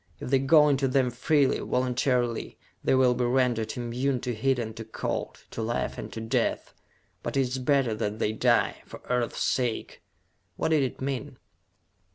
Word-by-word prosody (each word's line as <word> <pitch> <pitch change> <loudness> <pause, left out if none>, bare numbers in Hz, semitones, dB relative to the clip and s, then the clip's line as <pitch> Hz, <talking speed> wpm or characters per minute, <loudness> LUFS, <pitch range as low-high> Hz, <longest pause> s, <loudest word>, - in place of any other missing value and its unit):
If - - -6
they 135 - +5
go 150 +3 +6
into 135 -2 +2
them 130 -1 +2
freely, 140 +3 +2
voluntarily, 125 -1 0 0.3
they - - +3
will 130 -1 +4
be 125 0 0
rendered 120 -3 +1
immune 125 +2 -1
to 125 - -2
heat 130 +4 +1
and 110 -2 -4
to 110 - -5
cold, 110 - -4
to - - -4
life 115 +1 -2
and - - -7
to - - -5
death. 110 0 -1 0.5
But - - -3
it - - +4
is 130 0 -1
better 130 -3 +2
that 105 -1 -2
they 110 - 0
die, 110 - +2
for - - -10
Earth's 125 -1 0
sake!" 120 -3 -1 0.6
What - - 0
did 155 -2 +3
it 130 0 -3
mean? 135 0 -3
125 Hz, 180 wpm, -27 LUFS, 120-135 Hz, 0.6 s, go